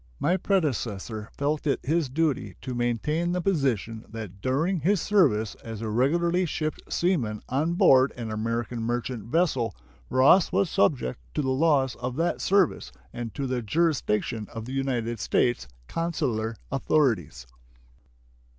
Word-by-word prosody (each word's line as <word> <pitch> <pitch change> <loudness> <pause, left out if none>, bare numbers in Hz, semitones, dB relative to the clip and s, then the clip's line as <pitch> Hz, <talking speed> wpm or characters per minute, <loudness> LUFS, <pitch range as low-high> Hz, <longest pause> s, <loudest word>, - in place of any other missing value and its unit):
My 175 - +2
predecessor 120 - -1
felt 150 +2 -1
it 140 - +1
his 155 0 0
duty 150 +1 -1
to 130 - -4
maintain 135 +9 0
the 180 - 0
position 130 - 0
that 105 -4 -8
during 160 - 0
his 190 +6 +2
service 135 - +2
as 115 -2 -6
a 110 0 -3
regularly 170 +9 +2
shipped 155 0 -3
seaman 130 - 0
on 155 +6 0
board 135 -9 +5
an 115 -2 -5
American 115 +2 -2
merchant 120 -1 -3
vessel 130 - +1 0.3
Ross 135 +8 +5
was 190 -1 +1
subject 140 - +1 0.2
to 150 - 0
the 130 - 0
laws 135 -2 +2
of 125 0 -4
that 165 +4 0
service 190 - +2 0.2
and 115 -2 -6
to 140 - -2
the 130 -1 -1
jurisdiction 115 -5 0
of 115 -1 -6
the 130 - -6
United 120 -4 -1
States 120 - +1 0.2
consular 115 -10 -2 0.2
authorities. 115 - +1
130 Hz, 140 wpm, -26 LUFS, 115-165 Hz, 0.3 s, board